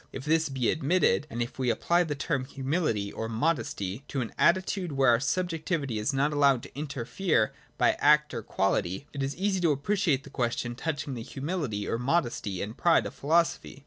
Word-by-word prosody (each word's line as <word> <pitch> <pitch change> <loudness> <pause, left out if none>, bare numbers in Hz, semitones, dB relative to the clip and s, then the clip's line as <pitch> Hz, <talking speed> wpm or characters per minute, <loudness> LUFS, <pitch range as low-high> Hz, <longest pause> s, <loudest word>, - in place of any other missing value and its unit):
If 135 - -7
this 160 0 +2
be 130 -3 +1
admitted, 155 0 +2
and 120 +1 -2
if 120 - -9
we 130 -2 +1
apply 175 +8 +2
the 150 -2 -3
term 135 -1 -1
humility 135 - -1
or 115 - -4
modesty 115 - -1
to 135 - -2
an 115 - -5
attitude 185 -1 +1
where 135 -2 +4
our 115 - +4
subjectivity 160 - -1
is 105 - 0
not 140 +2 +1
allowed 140 -4 +3
to - - -12
interfere 140 - 0 0.2
by - - +4
act 150 +1 +4
or 115 - -3
quality, 95 +3 -1
it 140 - -4
is 135 +1 -2
easy 195 +1 0
to 170 -3 +3
appreciate 150 -1 +1
the 140 - -13
question 120 -2 -1
touching 145 +1 -3
the 120 - -5
humility 135 - -3
or 115 - -1
modesty 120 - -1
and 105 +3 -6
pride 170 -2 +4
of - - -5
philo 165 +4 +3
sophy. 155 - -8
140 Hz, 195 wpm, -28 LUFS, 120-160 Hz, 0.2 s, where